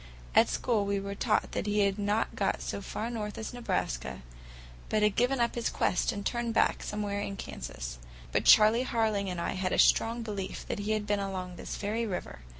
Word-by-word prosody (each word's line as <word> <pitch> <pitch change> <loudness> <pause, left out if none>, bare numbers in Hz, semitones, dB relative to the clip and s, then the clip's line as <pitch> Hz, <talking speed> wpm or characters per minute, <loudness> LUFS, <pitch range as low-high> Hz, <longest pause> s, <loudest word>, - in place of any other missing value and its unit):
At - - +6
school 225 -4 +1
we 200 0 +1
were 200 0 -4
taught 210 +2 +1
that - - -2
he 205 0 +2
had 200 0 +1
not 205 +2 0
got 195 - 0
so 200 - -4
far 220 +4 -4
north 210 -3 -4
as 220 - -5
Nebraska, 65 - -2 0.7
but 215 -1 +2
had 210 -1 +3
given 250 +2 +2
up 235 0 +2
his 235 - -1
quest 180 - +1
and 200 -1 -5
turned 235 -1 -1
back - - +3
somewhere 205 -1 -2
in 200 -1 -4
Kansas. - - -6 0.3
But - - +1
Charley 220 +3 +7
Harling 220 -5 0
and 180 -1 -3
I - - -1
had 185 -1 -1
a - - +1
strong 230 +1 +4
belief 200 -3 -5
that - - -3
he 210 +1 0
had 215 -1 -1
been 205 -1 +1
along 185 -2 -4
this - - -6
very 220 +3 -1
river. 180 - -5
205 Hz, 210 wpm, -30 LUFS, 195-225 Hz, 0.7 s, Charley